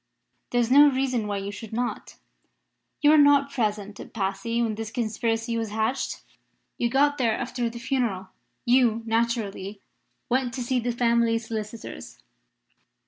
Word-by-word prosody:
There 245 - +1
is 240 0 +1
no 290 +2 +8
reason 255 -5 -1
why 205 -1 -2
you 200 +1 -4
should 210 +1 -9
not. 245 +2 -3 0.9
You 295 - +7
were 310 - +6
not 285 -1 +5
present 210 -5 -2
at - - -10
Passy 200 +3 -2
when 230 -2 +1
this 220 0 -5
conspiracy 225 0 -1
was 225 -1 -3
hatched; 220 +5 -2 0.6
you 240 - +1
got 285 +3 +2
there 230 -4 +2
after 245 -2 -2
the 235 - -9
funeral. 235 -7 -2 0.4
You, 240 -2 +3
naturally, 225 -3 -1 0.5
went 250 0 0
to 255 - -3
see 250 +1 0
the 245 +1 -1
family 235 -1 +2
solicitors. 220 0 -7
235 Hz, 150 wpm, -25 LUFS, 220-250 Hz, 0.9 s, no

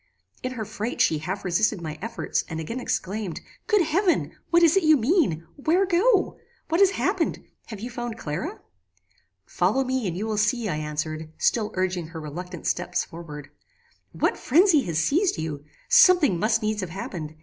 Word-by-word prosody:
"In 255 - -3
her 225 -4 -4
fright 215 +4 -4
she 155 - +3
half 190 +6 -5
resisted 190 +3 +1
my 155 -2 -6
efforts, 230 +2 -2
and 160 -1 -4
again 230 +11 -4
exclaimed, 200 -5 -3 0.3
'Good 420 -4 +4
heaven! 350 +4 +1
what 340 0 +4
is 330 0 +6
it 390 - +4
you 310 -2 +5
mean? 235 - +1
Where 335 +7 +2
go? 385 +3 +2 0.3
What 330 +4 +2
has 395 - +7
happened? - - 0 0.2
Have 215 -4 -8
you 240 +2 -5
found 240 -1 -5
Clara?" 150 -2 -5 0.8
"Follow 205 +10 +1
me, 260 -4 -1
and 175 -1 -3
you 210 - -2
will 220 -1 -2
see," 220 +1 +1
I 155 - -1
answered, 155 +1 -4
still 215 -3 +1
urging 185 -3 -1
her 165 0 -8
reluctant 175 +3 -7
steps 175 0 -1
forward. 150 -4 -10 0.6
"What - - 0
phrenzy 330 +2 +4
has 165 -3 -2
seized 320 - +2
you? 150 -3 -5 0.2
Something 365 - +6
must 220 +2 +1
needs 215 -1 -1
have 185 - -4
happened. 165 -4 -6
215 Hz, 175 wpm, -25 LUFS, -, 0.8 s, has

